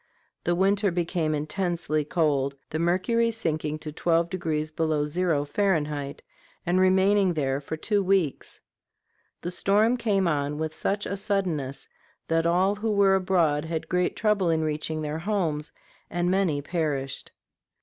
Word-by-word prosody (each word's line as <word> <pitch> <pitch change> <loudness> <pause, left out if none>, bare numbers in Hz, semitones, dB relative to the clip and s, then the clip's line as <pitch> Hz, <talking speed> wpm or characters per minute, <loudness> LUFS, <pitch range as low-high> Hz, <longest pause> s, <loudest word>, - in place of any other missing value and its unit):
The 175 - +2
weather 200 +2 +2
became 170 -3 -1
intensely 155 0 -1
cold, 145 -3 0 0.2
the 155 - -2
mercury 185 +8 +2
sinking 155 -8 -1
to 155 - -4
twelve 170 +2 +1
degrees 155 -4 -2
below 155 -2 0
zero, 155 -2 0
Fahrenheit, 150 -5 -1 0.4
and 175 +2 +2
remaining 190 0 +4
there 135 -2 0
for 160 +3 -5
two 205 +5 +1
weeks. 185 -6 0 0.8
The 175 - -4
storm 210 +6 +2
came 200 -6 +1
on 145 -2 -1
with 155 0 -3
such 200 +5 -1
suddenness 170 -10 -1 0.4
that 165 0 +2
all 185 +4 +3
who 220 +1 -1
were 200 -1 +5
abroad 175 -6 +2
had 160 0 -3
great 180 0 +1
trouble 210 -5 +1
in 160 -1 +1
reaching 155 0 -2
their 150 +1 -3
homes, 165 -5 -1 0.4
and 175 +1 0
many 180 -7 +1
perished. 145 -5 -2
170 Hz, 140 wpm, -26 LUFS, 150-190 Hz, 0.8 s, were